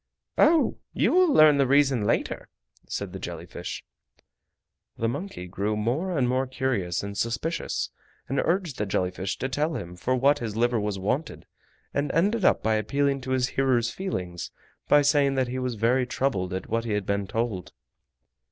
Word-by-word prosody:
"Oh! 320 +1 +4
you - - +2
will 365 -2 +5
learn 155 - +6
the 135 - +4
reason 135 -5 +3
later," - - -1 0.4
said - - -4
the - - -6
jelly - - -6
fish. - - -7 1.1
The 115 - 0
monkey 145 - -4
grew 100 +4 -2
more 150 - -1
and 130 -3 +2
more 130 +1 +1
curious 120 -11 -1
and 100 0 -5
suspicious, 120 +10 -2 0.4
and 135 +1 -1
urged 175 -5 0
the 105 - -1
jelly 95 -2 0
fish 95 +1 -4
to 130 - -2
tell 150 +4 -1
him 85 +1 -6
for 125 +9 0
what 140 +3 +3
his 110 -3 -4
liver 120 0 +2
was 105 -1 -2
wanted, 130 +11 -2 0.5
and 140 0 0
ended 200 +6 +2
up - - +3
by 110 0 +2
appealing 140 +5 0
to 130 - -7
his 130 -1 +1
hearer's 125 -4 +1
feelings 90 - -4 0.4
by 145 0 +5
saying 140 -1 +3
that 130 -2 +1
he 130 +1 -3
was 125 -2 -2
very 120 +4 +2
troubled 100 -9 -1
at 95 +1 -4
what 115 +1 -1
he 115 -2 -2
had 105 -2 -1
been 100 -1 -1
told. 110 -4 -2
125 Hz, 180 wpm, -26 LUFS, 105-145 Hz, 1.1 s, learn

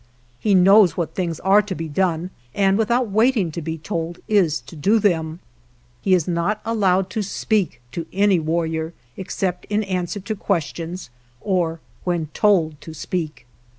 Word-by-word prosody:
He 205 -2 +2
knows 195 +1 +6
what 170 -3 -2
things 170 -4 -2
are 195 +3 +5
to 195 -2 -5
be 165 -1 -4
done, 175 +2 0 0.2
and 195 -1 +3
without 230 +1 +1
waiting 220 -4 +3
to 170 - -5
be 160 +1 -4
told 165 0 -4
is 180 -9 +3
to 135 +6 -13
do 195 +9 +3
them. 170 -5 0 0.6
He 190 - +4
is 170 -4 0
not 180 +5 0
allowed 195 -4 +1
to 220 - -1
speak 200 - -1
to 165 +4 -5
any 200 -1 +3
warrior 160 0 -1 0.2
except 185 -1 -3
in 210 +1 0
answer 185 0 -2
to 210 +3 -4
ques 195 -4 0
tions 170 -3 -7 0.3
or 170 -4 -1 0.2
when 170 -4 -1
told 165 -8 +2
to 160 - -9
speak. 160 -2 -4
180 Hz, 165 wpm, -22 LUFS, 165-200 Hz, 0.6 s, knows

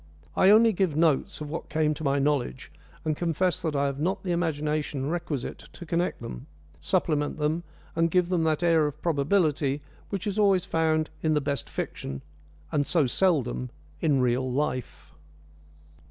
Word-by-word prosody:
I 190 - +5
only 220 +2 +6
give 185 -5 0
notes 155 -3 +2
of 150 - -5
what 165 - -5
came 155 -1 +1
to 155 - -8
my 140 -1 +2
knowledge, 140 - -1 0.3
and 155 -1 +1
confess 175 +2 0
that 160 -3 -2
I 140 0 +2
have 140 0 -2
not 190 +5 -1
the 180 - -2
imagination 150 -4 -1
requisite 165 -6 -3
to 175 - -9
connect 170 -5 -1
them, - - -7 0.3
supplement 145 - 0
them, 155 +2 0 0.3
and 165 0 +2
give 180 +1 +2
them 175 -3 +1
that 160 +1 +1
air 165 -3 +4
of 150 +1 -6
probability 150 -3 +1 0.3
which 195 -3 -3
is 205 0 -1
always 195 -3 +4
found 160 -1 +1
in 155 -1 +2
the - - +4
best 140 -2 -3
fiction, 70 0 -5 0.5
and 145 -1 +1
so 160 -4 +3
seldom 130 -5 +1 0.3
in 145 -5 +3
real 125 +1 +1
life. 130 -2 -3
155 Hz, 170 wpm, -27 LUFS, 140-175 Hz, 0.5 s, only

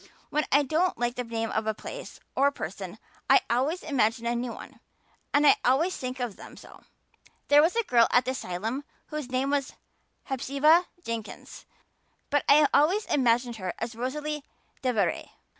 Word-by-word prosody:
When 300 0 +1
I 285 +2 +5
don't 320 +6 0
like 240 0 0
the 250 - -4
name 225 -1 -3
of 220 0 -1
a 220 - 0
place - - -9 0.2
or 275 +2 +4
a - - +2
person 190 - -7 0.3
I - - +7
always 280 +9 0
imagine 235 -6 0
a 235 0 0
new 240 0 -2
one - - -11 0.5
and 290 +1 +3 0.2
always 320 +9 +2
think 255 0 -5
of 240 -5 -4
them - - -12
so. - - -14 0.7
There 290 0 +7
was 330 +6 +2
a 465 - +2
girl 235 - +4
at 245 -1 +3
the 260 - 0
asylum 225 +3 -4 0.3
whose 300 -4 -5
name 260 +2 0
was 285 -1 -1 0.5
Hepzibah 280 +6 +3 0.2
Jenkins, 230 -4 -7 0.6
but 290 0 +2
I 295 +1 +7
always 370 +9 +3
imagined 240 -2 +1
her 185 -3 -4
as 230 +1 -4
Rosalia 295 +6 -3 0.4
DeVere. 220 -9 0
255 Hz, 170 wpm, -27 LUFS, 230-295 Hz, 0.7 s, I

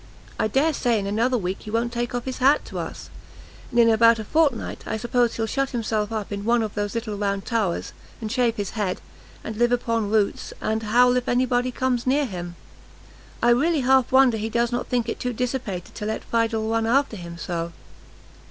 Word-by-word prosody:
I - - +2
dare 280 +8 +2
say 240 -4 +1
in 200 - -2
another 230 +5 +1
week 185 -2 -2
he - - -9
won't 230 +2 -1
take 240 +1 -2
off 245 - -3
his 260 -1 -4
hat 275 +3 +4
to - - -6
us; - - -7 0.6
and, 240 - -4
in 230 - +7
about 230 +1 +5
a 220 - -4
fortnight, 290 0 0
I 220 - -2
suppose 240 +1 +1
he'll 225 - -1
shut 275 +4 -1
himself 215 -2 -1
up 215 -2 -4
in 200 0 -4
one 235 +1 +2
of 215 - -4
those 205 0 -3
little 225 -2 -3
round 200 -1 -1
towers, 215 -7 -1 0.3
and 220 -2 -5
shave 240 -2 +1
his 205 -4 -3
head, 205 -5 -2 0.4
and 220 - -6
live 240 +1 +3
upon 230 -3 0
roots, 210 -2 0
and 220 +1 -1
howl 245 +3 +4
if 250 - -2
any 250 +1 +3
body 245 0 +1
comes 250 -1 -1
near 285 +3 +3
him. 175 -6 -6 0.9
I 240 - +5
really 295 +5 +3
half 260 0 +3
wonder 260 -3 +5
he 220 +1 -3
does 235 +1 +1
not 245 - -2
think 240 -2 0
it - - -3
too 250 0 -2
dissipated 240 -7 -3
to 210 - -5
let 220 - -3
Fidel 225 -1 0
run 225 0 0
after 270 0 +2
him 170 -3 -8
so. 170 -1 -3
230 Hz, 215 wpm, -24 LUFS, 215-245 Hz, 0.9 s, in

